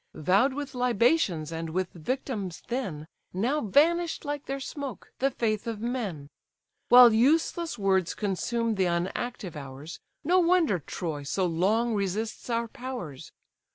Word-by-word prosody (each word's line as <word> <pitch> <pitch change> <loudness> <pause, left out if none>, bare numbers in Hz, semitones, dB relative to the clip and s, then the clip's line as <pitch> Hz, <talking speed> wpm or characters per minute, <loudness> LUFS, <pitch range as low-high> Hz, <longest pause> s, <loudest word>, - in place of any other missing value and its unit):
Vow'd 195 - +3
with 290 -1 -5
libations 235 - +2
and 165 0 -4
with 180 +2 -2
victims 200 - -4
then, 185 - -3 0.3
Now 245 +11 0
vanish'd 325 - +2
like 290 -1 -4
their 275 0 -3
smoke: 270 - -7
the 270 - +3
faith 225 -4 -1
of 225 -2 -3
men! 215 - -3 0.6
While 245 -2 +9
useless 315 +5 +2
words 190 -3 +1
consume 225 +3 -1
the 190 -3 +1
unactive 185 +3 -3
hours, 140 +2 -8 0.2
No 355 +5 +4
wonder 340 - +3
Troy 155 -1 -5
so 180 +7 -1
long 205 +8 +1
resists 210 +4 -2
our 230 0 0
powers. 230 - -7
225 Hz, 135 wpm, -28 LUFS, 180-260 Hz, 0.6 s, While